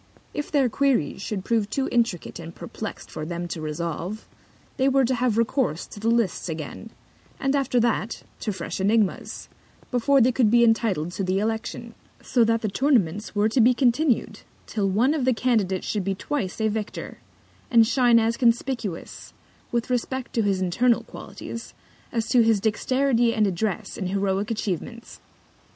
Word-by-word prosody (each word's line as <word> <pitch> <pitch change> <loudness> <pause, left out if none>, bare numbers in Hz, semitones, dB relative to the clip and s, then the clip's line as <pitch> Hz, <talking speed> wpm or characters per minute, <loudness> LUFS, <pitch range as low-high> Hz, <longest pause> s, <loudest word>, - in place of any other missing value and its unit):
If 295 - -4
their 280 -4 +3
Queries 245 - +1
should 200 -1 -4
prove 220 -3 +1
too 270 +5 -1
intricate 230 -8 0
and 170 0 -9
perplext 220 - -7
for 155 - -5
them 175 +2 -4
to 160 - -5
resolve, 170 +6 -4 0.5
they 265 +1 +3
were 270 -1 +3
to 260 - +1
have 245 -3 +1
Recourse 230 - 0
to - - -11
the 220 +2 0
Lists 230 -6 +1
again, 160 +7 -6 0.5
and 270 +1 +1
after 265 -3 +1
that, 230 -2 -1 0.2
to 215 - -2
fresh 185 -4 -5
Ænigmas, 205 +1 0 0.4
before 275 +3 +3
they 255 +1 +5
could 245 -3 +3
be 235 +2 +5
entitled 220 -8 +2
to 195 - -3
the 185 +1 0
Election: 225 +2 -3 0.3
So 245 -2 +2
that 230 0 +1
the - - +1
Tournaments 210 - +1
were 205 +1 +3
to 240 +3 +3
be 245 +2 +5
continu'd 255 +1 +1 0.2
till 200 -3 -1
One 235 +9 +3
of 305 -4 -1
the 255 -1 +2
Candidates 215 -7 +1
should 210 -3 -1
be 195 +1 -1
twice 195 -2 -3
a 220 - +2
Victor, 215 -1 -4 0.5
and 230 -2 +6
shine 245 0 +4
as 230 0 +2
conspicuous, 235 -6 -1 0.4
with 235 +1 -1
respect 250 +1 -2
to 230 - +2
his 195 -3 +1
internal 235 +7 +2
Qualities, 230 - -9 0.4
as 230 -1 -1
to 245 - +5
his 225 -2 +3
Dexterity 240 +3 +1
and 215 - +3
Address 195 +2 -2
in 190 - -2
heroic 195 +1 0
Atchievements. 225 +2 -4
225 Hz, 170 wpm, -24 LUFS, 195-245 Hz, 0.5 s, and